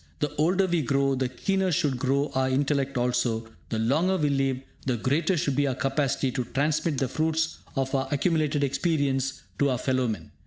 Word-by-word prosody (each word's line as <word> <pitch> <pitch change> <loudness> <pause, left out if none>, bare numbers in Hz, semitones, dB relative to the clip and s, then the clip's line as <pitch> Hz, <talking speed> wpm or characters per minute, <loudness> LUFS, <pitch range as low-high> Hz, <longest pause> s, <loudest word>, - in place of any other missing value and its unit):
The 150 -1 -1
older 180 +6 +3
we 175 -3 +1
grow, 135 0 +1
the 130 -1 -1
keener 190 +9 0
should 145 -4 +1
grow 140 +2 +1
our 130 -1 +1
intellect 140 0 0
also; 120 -2 0 0.2
the 110 - -2
longer 155 +12 +2
we 150 -4 +1
live, 135 -2 +1 0.2
the 130 -3 0
greater 155 - +1
should 140 -2 0
be 145 +1 +2
our 130 - -1
capacity 135 -1 0
to 125 - -2
transmit 145 +4 0
the 135 - +1
fruits 160 +3 -1 0.2
of 135 -1 -1
our 135 -1 +1
accumulated 150 -1 +1
experience 140 -2 0 0.2
to 140 - +3
our 125 - +1
fellowmen. 120 - -1
140 Hz, 185 wpm, -26 LUFS, 130-150 Hz, 0.2 s, older